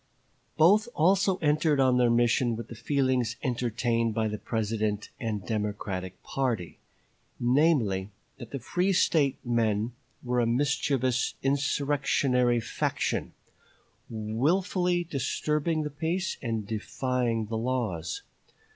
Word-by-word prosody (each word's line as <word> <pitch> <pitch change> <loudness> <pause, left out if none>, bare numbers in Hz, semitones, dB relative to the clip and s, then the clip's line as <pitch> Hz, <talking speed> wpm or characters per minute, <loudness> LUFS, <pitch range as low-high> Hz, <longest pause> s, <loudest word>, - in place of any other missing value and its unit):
Both 195 +8 +5
also 190 +3 +3
entered 150 -1 +2
on 130 -2 +4
their 120 -1 +4
mission 120 0 +2
with 115 0 -7
the 115 - -8
feelings 130 -1 0
entertained 115 -2 0
by 110 -1 +1
the 105 0 -4
President 110 -2 -2
and 110 -6 -3
Democratic 100 -4 -3
party; 120 -10 -2 0.6
namely, 120 - +2 0.3
that 120 -3 -8
the 140 - -4
free 180 - 0
State 145 -6 +2
men 115 -2 +1 0.3
were 125 -1 0
a 120 - +2
mischievous 130 0 +1
insurrectionary 135 -3 +1
faction, 110 - -2 0.8
willfully 175 - 0
disturbing 155 +2 -1
the 150 - -4
peace 170 +5 -2
and 115 -4 -2
defying 115 +2 -1
the 110 +2 -4
laws. 110 -10 -2
125 Hz, 110 wpm, -28 LUFS, 110-145 Hz, 0.8 s, Both